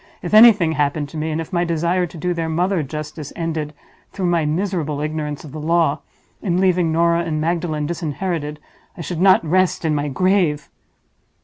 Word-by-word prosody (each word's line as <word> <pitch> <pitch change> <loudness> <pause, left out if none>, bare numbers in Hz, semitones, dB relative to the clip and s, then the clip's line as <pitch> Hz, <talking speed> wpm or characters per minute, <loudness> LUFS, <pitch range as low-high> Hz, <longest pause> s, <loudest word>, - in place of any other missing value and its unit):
If - - -5
anything 215 -7 +7
happened 145 -1 -1
to 155 - -8
me, 155 +1 -2
and 155 0 -2
if 165 +3 -6
my 175 0 +2
desire 170 +2 0
to 170 - -12
do 180 +3 -1
their 165 -1 -3
mother 175 +2 0
justice 150 0 -6
ended 160 -3 -3 0.4
(through 190 - -3
my 170 -3 +1
miserable 160 -3 -2
ignorance 150 -1 -4
of 150 - -10
the 155 - -7
law) 160 -1 +1 0.4
in 180 -3 0
leaving 180 -3 +2
Norah 170 +1 +2
and 160 -3 -2
Magdalen 160 -2 -1
disinherited, 160 -1 -3 0.4
I - - -6
should 165 +2 -4
not 185 -3 +5
rest 185 +1 +1
in 155 - +1
my 145 0 -1
grave!" 155 -1 +1
165 Hz, 185 wpm, -20 LUFS, 150-175 Hz, 0.4 s, anything